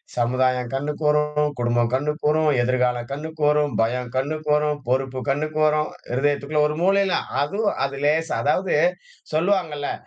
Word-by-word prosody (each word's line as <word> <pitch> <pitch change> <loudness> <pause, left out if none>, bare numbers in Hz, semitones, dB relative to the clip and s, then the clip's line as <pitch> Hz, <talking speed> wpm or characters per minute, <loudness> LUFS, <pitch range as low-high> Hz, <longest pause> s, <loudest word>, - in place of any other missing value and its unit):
சமுதாயம் 125 +1 +1
கண்ணுக்கு 145 +3 -3
வரும், 150 0 +2
குடும்பம் 120 -1 +1
கண்ணுக்கு 150 +4 -1
வரும், 155 0 +2
எதிர்காலம் 125 -1 0
கண்ணுக்கு 155 +3 -6
வரும், 150 -2 +2
பயம் 120 +1 -1
கண்ணுக்கு 150 +3 -2
வரும், 150 0 0
பொறுப்பு 130 0 -1
கண்ணுக்கு 155 +2 -1
வரும். 150 0 +1 0.2
இருதயத்திற்குள்ள 145 +3 +1
ஒரு 150 0 -4
மூளைல 195 0 +3 0.3
அதுவும் 200 +9 -1
அது 140 0 -5
லேசா, 160 +2 +1
அதாவது 180 +6 +1 0.6
சொல்வாங்கள்ல 160 -4 0
150 Hz, 135 wpm, -23 LUFS, 130-155 Hz, 0.6 s, மூளைல